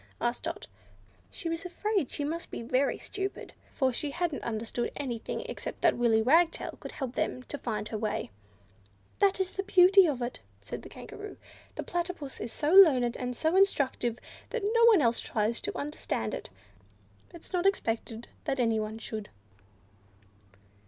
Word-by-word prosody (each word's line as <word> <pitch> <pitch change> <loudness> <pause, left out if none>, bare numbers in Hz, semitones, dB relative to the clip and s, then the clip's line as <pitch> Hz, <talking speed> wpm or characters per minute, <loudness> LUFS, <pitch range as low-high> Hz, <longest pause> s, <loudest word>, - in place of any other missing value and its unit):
asked 240 0 -1
Dot. - - -4 0.6
She 215 - -6
was 330 0 -2
afraid 375 - -1
she 290 - -3
must 330 +4 -3
be - - -6
very 255 +4 +1
stupid, 390 -1 -5 0.2
for 260 -2 +2
she 290 +4 -2
hadn't 335 -1 -2
understood 230 +1 -2
anything 245 -5 -3
except - - -6
that - - +4
Willy 225 -2 +3
Wagtail 325 +7 +3
could - - -8
help 265 -4 -4
them 255 - -2
to 290 - -6
find 215 -4 -3
her 215 - -3
way. 215 - -2 0.9
"That 395 -1 +3
is 380 0 0
the 390 - -2
beauty 380 -1 +6
of 260 -5 -1
it 240 - -4
all," - - -32 0.2
said - - -6
the - - -11
Kangaroo, 415 0 -9 0.4
"the - - -4
Platypus 345 -5 -4
is 230 - -4
so 300 +1 -1
learned 265 -11 +7
and 250 -1 -3
so 320 +2 +1
instructive, 270 - +2 0.3
that 475 -3 -3
no 460 +3 +4
one 320 - +6
tries 225 0 -1
to 410 - -2
understand 285 - -3
it; - - -5 0.8
it 340 - -11
is - - -16
not 360 +1 +3
expected 230 - -1 0.2
that 275 -3 -1
anyone 220 -2 0
should." 220 -2 -6
280 Hz, 165 wpm, -29 LUFS, 235-360 Hz, 0.9 s, learned